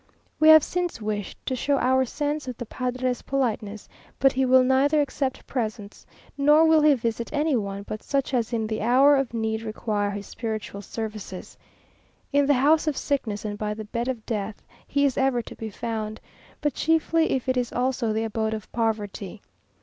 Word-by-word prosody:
We 310 - +6
have 315 -1 +9
since 355 -6 -2
wished 210 -2 -4
to 260 - -1
show 280 +3 +1
our 260 0 +3
sense 290 +2 -3
of 250 -2 -5
the 240 - -5
padre's 250 +1 -2
politeness, 220 -6 -2 0.3
but 270 0 +4
he 265 0 +1
will 260 0 +6
neither 270 +4 +3
accept 275 -2 -2
presents, 215 -4 -5 0.3
nor 295 +3 +5
will 320 -1 +5
he 300 -1 +6
visit 230 -1 -3
any 300 -1 +1
one 200 -3 -3
but 215 +1 -6
such 275 -1 -1
as 240 -2 0
in 225 -2 -1
the 215 0 -3
hour 260 +6 +5
of 270 -3 0
need 220 -1 -2
require 215 -2 -2
his 200 0 -5
spiritual 215 -3 -5
services. 215 -3 -7 0.8
In 285 -1 +4
the 285 - +4
house 305 +5 +3
of 300 - 0
sickness 220 -8 -2
and 205 -1 -4
by 210 0 -2
the 215 0 -7
bed 235 +3 -3
of 245 -4 -3
death 210 -2 -4 0.2
he 285 0 +2
is 275 - +1
ever 265 -3 +2
to - - -10
be 225 - -6
found, 220 0 -4 0.4
but 295 -2 0
chiefly 325 +2 +2
if 260 -1 -2
it 260 - +2
is 245 -1 -1
also 250 -2 0
the 220 +1 0
abode 220 0 -1
of 215 - -9
poverty. 215 -3 -2
245 Hz, 190 wpm, -25 LUFS, 215-275 Hz, 0.8 s, have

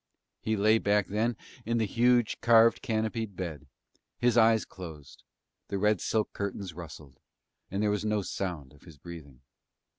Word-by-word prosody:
He 110 0 -1
lay 110 +2 +4
back 105 -1 +1
then 110 +3 0 0.3
in 115 +1 -1
the 110 - +2
huge, 120 +2 +2
carved, 115 0 +5
canopied 110 -2 -2
bed; 85 -6 -6 0.5
his 120 -1 +2
eyes 115 -1 +5
closed, 80 -7 -11 0.5
the 100 - -3
red 105 0 +2
silk 110 -1 -1
curtains 100 -2 -4
rustled, 75 -5 -11 0.5
and 100 +2 -2
there 105 - +2
was 105 0 -1
no 105 -1 0
sound 85 -9 -4
of 75 - -20
his 85 -5 -15
breathing. 70 -5 -11
105 Hz, 155 wpm, -29 LUFS, 85-110 Hz, 0.5 s, carved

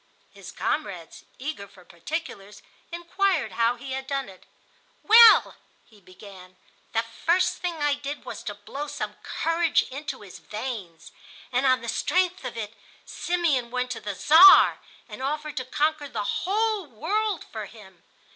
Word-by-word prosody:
His - - -11
comrades, - - -4
eager 265 -7 -6
for 185 -2 -19
particulars, 205 - -7 0.3
inquired 345 0 -1
how 235 +1 +1
he 265 +2 -9
had 265 0 -5
done 275 -5 -3
it. 185 - -17 0.6
"Well," 450 +1 +7 0.3
he 215 -3 -22
began, 185 0 -14 0.4
"the 225 0 0
first 345 +10 0
thing 355 -2 -3
I 290 -2 +1
did 285 0 -6
was - - -7
to 205 - -5
blow 245 +9 -7
some - - -6
courage 330 0 0
into 285 -1 -6
his 195 -3 -12
veins, 210 -7 -7 0.4
and, 255 +2 +1
on 255 -2 +3
the 235 - -8
strength 365 +8 0
of 250 -2 -6
it, 215 -1 -5 0.3
Simeon 325 -9 -1
went 250 +1 -3
to 235 - -4
the 205 -1 -5
Czar 340 - +7 0.3
and - - -10
offered 300 +2 -4
to 255 - -2
conquer 300 +2 -1
the 210 - -3
whole 415 - -1
world 375 - -2
for 215 -2 -6
him. 190 -6 -16
270 Hz, 155 wpm, -25 LUFS, 215-330 Hz, 0.6 s, Well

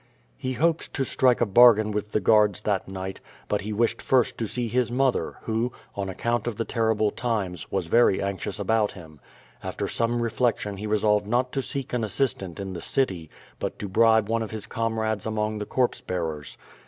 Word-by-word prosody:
He 130 - -3
hoped 165 +4 0
to 135 - +1
strike 130 -3 +3
a - - +5
bargain 110 0 +6
with 105 0 -3
the - - +2
guanls 105 0 +3
that 105 -2 -1
night, 95 0 -6 0.3
but 105 - 0
he 105 +2 -5
wished 115 +2 0
first 130 -2 +2
to 115 - -1
see 120 +2 -2
his 120 +1 0
mother, 130 +1 +1
who, 115 +2 -1 0.2
on 100 -1 -3
account 120 +4 -1
of 120 - -2
the 115 - -1
terrible 110 -2 +1
times, 100 -8 -3
was 95 -3 -1
very 105 +2 +4
anxious 100 -2 -3
about 110 -2 +1
him. 80 -5 -13 0.4
After - - -3
some 120 +1 0
re 115 - -1
flection 105 -5 0
he 105 - -4
resolved, 105 -1 +2
not 125 +3 +1
to 135 - -1
seek 135 -1 -4
an 120 -2 0
assistant 100 -5 -1
in 95 -1 -5
the 85 - -6
city, 95 - -1 0.3
but - - -3
to 105 - -5
bribe 110 +1 +4
one 115 +1 0
of 110 - -3
his 110 -2 -6
comrades 110 -2 -2
among 110 0 -1
the 105 - -5
corpse 125 -2 0
bearers. 80 -5 -4
110 Hz, 200 wpm, -25 LUFS, 100-120 Hz, 0.4 s, bargain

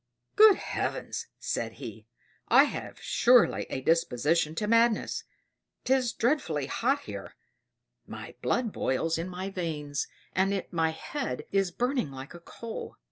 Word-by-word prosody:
"Good 430 -2 +9
Heavens!" - - -3
sighed - - -3
he. - - -9 0.4
"I - - +7
have - - -5
surely 245 -1 +4
a 130 - -3
disposition 155 +1 +2
to 210 - -1
madness 230 +1 +2 0.6
'tis 255 -2 +2
dreadfully 200 - 0
hot 270 - 0
here; - - -8 0.7
my - - -8
blood 240 -3 0
boils 160 +5 0
in 170 +2 -3
my 185 +2 -5
veins 150 -6 -3 0.3
and 195 0 +1
my 165 -2 +2
head 160 - -4
is 195 -2 +2
burning 245 - -1
like 135 +3 -9
a 175 - -10
coal." 225 +6 -8
185 Hz, 135 wpm, -29 LUFS, 160-240 Hz, 0.7 s, Good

